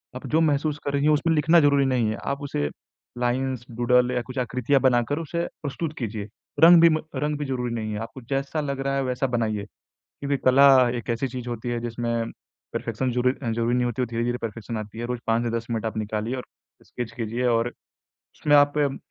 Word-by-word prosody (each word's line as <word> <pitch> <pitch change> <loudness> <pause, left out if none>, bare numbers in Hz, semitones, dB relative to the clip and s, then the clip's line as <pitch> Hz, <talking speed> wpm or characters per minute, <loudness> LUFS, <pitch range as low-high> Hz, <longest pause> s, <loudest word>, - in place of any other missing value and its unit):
आप 125 - -7
जो 160 +2 +2
महसूस 150 -1 +1
कर 140 - -1
रही 140 0 +1
हैं, 155 - +4
उसमें 165 +2 +2
लिखना 160 +3 +5
ज़रूरी 140 -2 +4
नहीं 125 -4 +1
है, 110 - -2
आप 140 +1 -2
उसे 75 - -2 0.5
लाइन्स, 125 0 -1
डूडल 125 +1 +2
या 125 -1 0
कुछ 130 - -10
आकृतियाँ 125 +2 +1
बनाकर 130 +3 +2
उसे 170 +1 -2 0.2
प्रस्तुत 155 +2 -4
कीजिए, 110 -4 -4 0.4
रंग 170 0 +9
भी 170 - +8
म 155 -1 +1 0.2
रंग 150 +2 -1
भी 145 - -3
ज़रूरी 125 -3 -2
नहीं 110 -2 -3
है। 105 - -3
आपको 115 +3 -8
जैसा 140 +3 -2
लग 140 -2 -3
रहा 135 0 0
है 135 - 0
वैसा 125 +1 -1
बनाइए, 110 -3 -1 0.4
क्योंकि 140 0 -4
कला 135 +2 +7 0.3
एक 120 - -7
ऐसी 115 +3 0
चीज़ 125 -1 -7
होती 120 +1 -4
है 120 0 -1
जिसमें 115 -1 -2 0.4
परफेक्शन 130 -1 -2
ज़रू 125 +1 +2
अ, 130 -2 -5
ज़रूरी 115 +1 0
नहीं 125 0 +1
होती, 120 +1 -2
वो - - +2
धीरे-धीरे 120 +1 -2
परफेक्शन 115 0 -5
आती 110 +1 -7
है। 120 - -3
रोज़ 125 0 -3
5 115 +1 +2
से 120 - -1
10 115 0 -7
मिनट 115 -1 -2
आप 110 - -3
निकालिए 110 +3 -2
और 125 - -5 0.4
स्केच 120 -2 -6
कीजिए 115 +1 -3
और 115 0 +2 0.7
उसमें 145 -1 +3
आप 145 +1 +5
म 140 -2 +1
125 Hz, 220 wpm, -25 LUFS, 115-140 Hz, 0.7 s, रंग